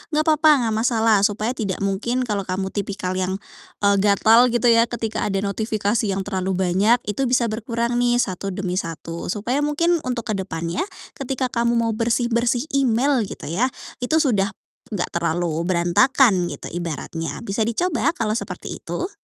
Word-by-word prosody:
nggak 310 - +3
papa 310 -4 +4
nggak 220 -1 0
masalah, 225 -3 +3
supaya 215 +3 -2
tidak 200 -6 -3
mungkin, 235 +6 -1
kalau 205 -5 -2
kamu 190 +1 -2
tipikal 195 -2 -3
yang, 185 0 -1 0.5
eee, 200 -1 +4
gatal, 220 +4 +5
gitu 240 0 +3
ya, 230 +1 +5
ketika 225 -2 -3
ada 195 0 -1
notifikasi 215 +1 -1
yang 195 0 -1
terlalu 190 -2 -2 0.2
banyak, 220 +6 +3
itu 240 +6 -1
bisa 240 -3 +2
berkurang 235 +2 -1
nih 240 0 +3
satu 195 -5 -1
demi 185 -1 -2
satu, 165 0 -6
supaya 225 +8 -1
mungkin 330 +4 +1
untuk 235 -3 -2
ke 195 - -1
depannya 170 - -3 0.3
ketika 260 -1 -2
kamu 235 0 +1
mau 230 -1 +1
bersih-bersih 235 +2 +1
email, 270 0 +2
gitu - - -9
ya, 240 +9 +2 0.3
itu 250 +6 0
sudah 205 -8 +1 0.4
enggak 180 - -1
terlalu 170 -1 -1
berantakan, 185 +3 +3
gitu - - -6
ibaratnya. 165 -1 -5
Bisa 215 0 -1
dicoba 320 +7 0
kalau 220 -4 -1
seperti - - -6
itu? 370 - -4
220 Hz, 160 wpm, -22 LUFS, 190-245 Hz, 0.5 s, gatal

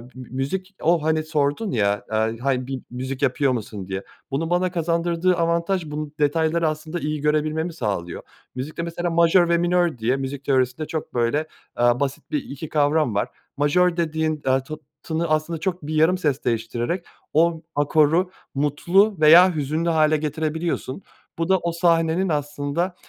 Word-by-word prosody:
bi 130 - -8
bi - - -19
müzik 185 +9 -3
O, 165 -1 +2
hani, 155 0 +1
sordun 155 +6 -1
ya, 100 -4 0
eee, 110 +1 0
hani, 130 -1 -1
bir 135 -2 -4
müzik 130 +2 -5
yapıyor 135 0 +2
musun 105 -5 -5
diye. 95 0 -4 0.3
Bunun 160 +4 -1
bana 180 +1 +1
kazandırdığı 170 +1 +1
avantaj 170 +2 0
bu 150 0 -4
detayları 160 +2 +2
aslında 155 +2 -3
iyi 150 -1 -3
görebilmemi 155 +3 0
sağlıyor. 100 - -3 0.3
Müzikte 145 +6 -4
mesela 170 +1 -3
majör 170 +1 +4
ve 170 - +4
minör 175 -3 +1
diye 120 +3 +1
müzik 135 +1 -5
teorisinde 130 +2 +1
çok 160 - -5
böyle, 125 +6 0 0.3
aaa, 120 0 +3
basit 140 -1 -3
bir 300 -2 -1
2 145 +2 -8
kavram 150 -5 +2
var. 100 - +1 0.3
Majör 170 +5 +2
dediğin, 160 -2 -1
eee, 130 0 +2
tı 155 +3 -6 0.3
tını 165 +1 -1
aslında 155 +1 0
çok 180 +1 -3
bir 155 - -3
yarım 160 +4 +4
ses 150 -6 -1
değiştirerek 120 +8 -2 0.3
o 165 +1 +3
akoru 155 +4 +3 0.3
mutlu 175 +9 +2
veya 170 +4 +7
hüzünlü 155 +3 -1
hâle 155 -1 +3
getirebiliyorsun. 155 0 -3 0.4
Bu 165 +1 -2
da 190 - +5
o 170 - -2
sahnenin 170 +1 +2
aslında, 145 +4 -2
155 Hz, 165 wpm, -23 LUFS, 135-170 Hz, 0.4 s, veya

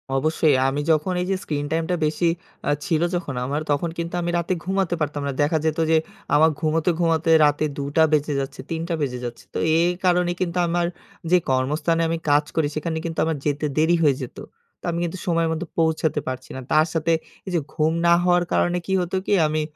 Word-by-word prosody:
অবশ্যই 155 0 +2
আমি 140 +2 -1
যখন 155 +4 +1
এই - - -1
যে - - +2
স্ক্রিন 145 -1 -2
টাইম 165 0 +1
টা - - +2
বেশি 165 +3 +1 0.4
আ - - +4
ছিল 165 -4 +1
যখন 150 -7 -3
আমার, 145 +3 -2
তখন 155 +4 0
কিন্তু 170 +1 -4
আমি 170 0 -1
রাতে 170 +2 0
ঘুমাতে 190 -2 0
পারতাম 145 -1 -2
না। - - -1
দেখা 155 +2 +2
যেত 160 +1 0
যে 160 - +5 0.4
আমার 160 +2 +6
ঘুমাতে, 160 +2 +1
ঘুমাতে 165 -1 +1 0.2
রাতে 145 +1 +2
দুটা 145 +3 +2
বেজে 150 0 +2
যাচ্ছে, 135 0 -5
৩ 165 -1 -2
টা - - 0
বেজে 125 -3 -2
যাচ্ছে। 120 - -7
তো - - -3 0.2
এই 175 +1 +3 0.2
কারণে 180 -1 +3
কিন্তু 180 -1 -1
আমার 175 0 +1 0.5
যে 180 - +7
কর্মস্থানে 150 +6 +1
আমি 165 - 0
কাজ 145 +1 +4
করি 160 -3 +2
সেখানে 160 +1 -2
কিন্তু 165 -1 -3
আমার 160 -2 -1
যেতে 145 +1 0
দেরি 160 +3 +4
হয়ে 140 -3 +4
যেত। 125 - -7 0.4
তো - - -63
আমি 170 - -2
কিন্তু 175 +2 -3
সময়ের 165 -1 +2
মতো 165 +2 -4
পৌঁছাতে 160 -2 +1
পারছি 130 0 -5
না। - - -5
তার 155 +2 +4
সাথে 165 0 +1 0.4
এই - - -3
যে - - +3
ঘুম 160 0 +1
না 170 - +7
হওয়ার 175 -1 +3
কারণে 175 0 +2
কি 190 - -2
হতো 180 +2 -3
কি? - - +1
আমি 155 0 0
160 Hz, 215 wpm, -23 LUFS, 150-170 Hz, 0.5 s, যে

